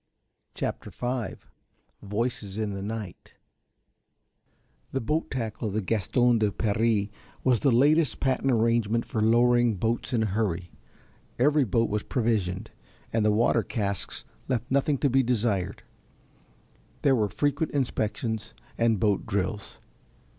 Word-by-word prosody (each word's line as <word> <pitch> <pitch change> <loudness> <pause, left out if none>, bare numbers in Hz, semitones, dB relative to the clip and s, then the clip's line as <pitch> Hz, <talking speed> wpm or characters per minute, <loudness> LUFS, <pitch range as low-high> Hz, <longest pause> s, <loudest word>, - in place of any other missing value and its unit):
CHAPTER - - -3
V 125 -1 -3 0.7
VOICES 105 -1 -3
IN 110 -2 -1
THE 100 - -5
NIGHT 105 -3 -6 1.6
The 135 - +1
boat 150 +8 -1
tackle 115 -3 -3
of 100 - -4
the 110 - +1
Gaston 115 +4 +2
de 105 -2 +2
Paris 105 0 +1 0.3
was 125 -3 +3
the 140 - +3
latest 145 +2 +3
patent 135 0 +1
arrangement 115 -1 +2
for 110 - -2
lowering 120 +1 +4
boats 110 +4 -1
in 115 -3 +2
a - - +1
hurry; 95 -4 -1 0.7
every 145 +2 +4
boat 115 +2 +2
was 105 0 0
provisioned, 105 -8 -1 0.4
and 115 -1 +2
the 105 - +4
water 115 +2 +3
casks 100 -4 -3 0.2
left 125 -2 -2
nothing 140 +1 +2
to 140 - +2
be 135 0 +3
desired, 110 -7 0 1.2
there 135 -2 +5
were 105 -4 +1
frequent 145 +5 0
inspections 110 -4 -2 0.2
and 115 -3 +3
boat 100 0 +1
drills. 100 0 -3
115 Hz, 130 wpm, -27 LUFS, 105-125 Hz, 1.6 s, there